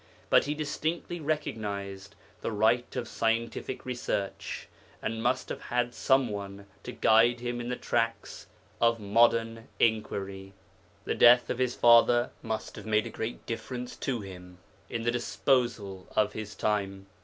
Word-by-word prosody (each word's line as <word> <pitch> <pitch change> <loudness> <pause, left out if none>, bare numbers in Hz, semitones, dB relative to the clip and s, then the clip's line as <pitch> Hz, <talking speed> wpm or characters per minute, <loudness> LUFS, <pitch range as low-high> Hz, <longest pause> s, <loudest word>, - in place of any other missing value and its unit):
But - - +6
he 145 +1 -2
distinctly 160 +3 -3
recognized 100 -10 -4 0.3
the - - -2
right 110 +3 +2
of 125 -2 -3
scientific 115 +3 -2
research, 120 -6 -3 0.3
and 115 0 -3
must 125 +2 0
have - - -5
had 120 0 0
some 130 -2 +2
one 100 -1 -6 0.2
to - - -7
guide 115 +2 +4
him 120 0 -3
in 120 - -5
the 125 - -1
tracks 115 -1 -2 0.3
of 115 0 +3
modern 115 +2 +2
inquiry. 100 -3 -1 0.5
The - - 0
death 120 +1 +6
of 125 - -3
his 125 -1 +1
father 120 +1 +5
must 110 -2 -4
have - - -9
made 110 0 +2
a 115 - -6
great 110 +2 -5
difference 125 +2 -5
to 125 -4 -2
him 90 -2 -10 0.3
In 115 -1 -3
the 120 - +2
disposal 120 -6 0
of 105 -1 +2
his 105 -1 -6
time. 100 -2 -1
115 Hz, 150 wpm, -29 LUFS, 105-120 Hz, 0.5 s, But